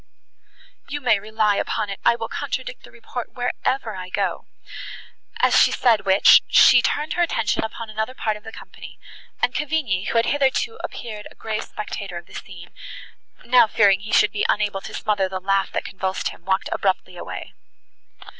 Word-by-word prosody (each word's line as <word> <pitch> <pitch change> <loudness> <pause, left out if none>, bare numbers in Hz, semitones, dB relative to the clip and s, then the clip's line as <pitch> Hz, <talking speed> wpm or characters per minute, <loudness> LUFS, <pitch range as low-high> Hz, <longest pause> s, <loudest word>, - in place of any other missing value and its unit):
"You 290 - -3
may 240 -6 +3
rely 215 0 0
upon 205 - -2
it 195 - -6
I - - +4
will 225 -1 -5
contradict - - -5
the - - -15
report 235 +1 -8
wherever 245 -2 -2
I 185 -1 -7
go;" 190 -2 -2 0.9
as - - +5
she - - +5
said 225 -5 +2
which, 190 +1 +7
she - - +7
turned 300 +1 -1
her 350 - 0
attention 230 -10 0
upon 225 +1 -6
another 220 +4 -4
part 215 -4 -1
of 210 - -12
the 220 - -9
company; - - -12 0.5
and - - +2
Cavigni, 280 -11 -1
who - - 0
had 230 - +3
hitherto 290 +11 0
appeared 215 -3 -7
a - - -19
grave 215 -1 -4
spectator 200 -3 -6
of 170 - -9
the - - -18
scene, 175 -2 -10 0.7
now 245 -1 +6
fearing 200 -3 +4
he 210 +2 -8
should 210 - +4
be 205 - -2
unable 205 -2 0
to - - -9
smother 200 -3 0
the 190 0 -4
laugh, 195 +1 0
that - - -2
convulsed 190 0 -3
him, 170 - -14
walked 190 0 0
abruptly 185 -2 -1
away. 175 - -8
215 Hz, 180 wpm, -22 LUFS, 195-235 Hz, 0.9 s, which